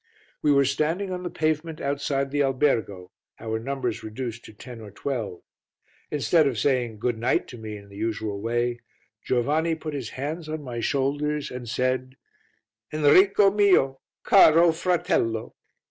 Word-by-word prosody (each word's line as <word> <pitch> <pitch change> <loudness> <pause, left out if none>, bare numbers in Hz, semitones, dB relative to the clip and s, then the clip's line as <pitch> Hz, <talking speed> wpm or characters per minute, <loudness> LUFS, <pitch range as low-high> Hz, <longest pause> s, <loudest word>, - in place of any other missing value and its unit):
We 150 - +3
were 140 -1 +4
standing 160 +8 -1
on 180 -1 -4
the 180 - -4
pavement 155 -1 -1
outside 140 -1 -1
the 145 0 +1
albergo, 125 -9 0 0.3
our 110 -1 -3
numbers 125 -1 -3
reduced 115 +1 -6
to - - -11
ten 115 +2 -10
or 105 - -9
twelve; 110 -4 -4 0.7
instead 150 +2 +3
of 130 -5 -2
saying 120 -2 0
"Good 115 +1 -2
night" 120 +3 +1
to 120 - -9
me 110 -1 -6
in 100 0 -14
the 100 - -13
usual 110 -2 -3
way, 120 +2 -1 0.4
Giovanni 150 +7 +1
put 155 -1 -6
his 130 -6 -4
hands 155 +4 -4
on 155 -1 -4
my 120 -3 -5
shoulders 145 +4 -1
and 125 -2 -7
said 130 +2 -1 0.8
"Enrico 190 +7 +5
mio! 185 -10 +3 0.2
Caro 165 +2 +6
fratello! 160 -10 0
135 Hz, 150 wpm, -25 LUFS, 115-155 Hz, 0.8 s, Caro